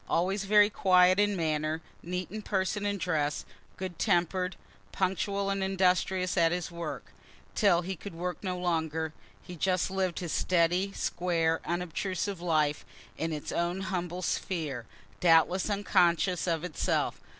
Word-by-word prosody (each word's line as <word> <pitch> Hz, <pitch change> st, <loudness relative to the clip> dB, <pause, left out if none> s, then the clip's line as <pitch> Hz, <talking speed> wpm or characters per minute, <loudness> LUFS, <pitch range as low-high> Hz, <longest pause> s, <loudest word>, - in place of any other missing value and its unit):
Always 190 Hz, +3 st, +1 dB
very 210 Hz, +1 st, +5 dB
quiet 185 Hz, -1 st, +5 dB
in 205 Hz, 0 st, +3 dB
manner, 155 Hz, -2 st, -1 dB, 0.2 s
neat 180 Hz, 0 st, -4 dB
in 215 Hz, +1 st, -5 dB
person 205 Hz, 0 st, -1 dB
and 200 Hz, -1 st, -1 dB
dress, 150 Hz, -5 st, -1 dB, 0.3 s
good 185 Hz, -2 st, -6 dB
temper'd 180 Hz, -1 st, +1 dB, 0.4 s
punctual 195 Hz, +1 st, 0 dB
and 195 Hz, -1 st, -1 dB
industrious 185 Hz, -1 st, +1 dB
at 165 Hz, -1 st, +4 dB
his 175 Hz, -1 st, -2 dB
work, 170 Hz, 0 st, -6 dB, 0.4 s
till 180 Hz, -5 st, +3 dB
he 190 Hz, +2 st, -4 dB
could 190 Hz, +1 st, -9 dB
work 180 Hz, +3 st, -4 dB
no 185 Hz, -2 st, -2 dB
longer 160 Hz, -3 st, -1 dB, 0.3 s
he 180 Hz, -, -9 dB
just 185 Hz, +2 st, 0 dB
lived 190 Hz, -2 st, -1 dB
his 175 Hz, -3 st, -3 dB
steady, 180 Hz, +2 st, +2 dB
square, 165 Hz, -2 st, 0 dB
unobtrusive 180 Hz, +2 st, -2 dB
life, 155 Hz, -4 st, +1 dB, 0.3 s
in 165 Hz, 0 st, -2 dB
its 150 Hz, -2 st, -4 dB
own 175 Hz, +2 st, -1 dB
humble 180 Hz, -2 st, -3 dB
sphere, 150 Hz, -11 st, -2 dB, 0.3 s
doubtless 175 Hz, +3 st, +4 dB
unconscious 180 Hz, -3 st, +2 dB
of 165 Hz, -2 st, 0 dB
itself. 180 Hz, -4 st, -1 dB
180 Hz, 140 wpm, -29 LUFS, 165-190 Hz, 0.4 s, very